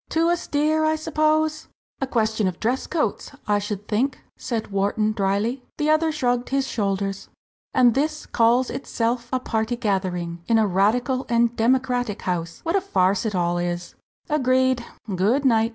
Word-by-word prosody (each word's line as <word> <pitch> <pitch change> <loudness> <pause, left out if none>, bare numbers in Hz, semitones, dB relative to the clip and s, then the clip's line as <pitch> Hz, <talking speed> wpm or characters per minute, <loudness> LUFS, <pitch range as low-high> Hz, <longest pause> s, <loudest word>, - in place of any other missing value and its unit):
"Too 330 +1 +2
austere, 310 -2 +1
I 315 0 +2
suppose?" 310 0 0 0.3
"A 270 - 0
question 220 -4 +1
of 180 -2 -4
dress 245 +4 -1
coats, 300 - -2
I 205 -1 +3
should 205 0 -5
think," 255 +5 0 0.2
said 230 -4 -4
Wharton, 205 +2 +1
drily. 215 +5 0 0.2
The 305 -1 +2
other 315 +1 +3
shrugged 245 -5 0
his 275 0 +1
shoulders. 195 -4 -2 0.5
"And 245 -3 +5
this 305 +4 -1
calls 235 +2 +2
itself 240 -2 -2
a 255 - +1
party 225 -1 -1
gathering 185 -6 -2
in 230 - +4
a 220 - +4
radical 240 +7 +1
and 235 0 +2
democratic 245 -2 +1
house 170 -2 -3
what 330 +3 0
a 395 - +3
farce 195 - +1
it 210 - -3
all 175 -1 +1
is!" 175 0 -3 0.3
"Agreed! 260 -3 +2 0.3
good 225 +10 +2
night." 225 -3 +4
235 Hz, 160 wpm, -23 LUFS, 205-270 Hz, 0.5 s, And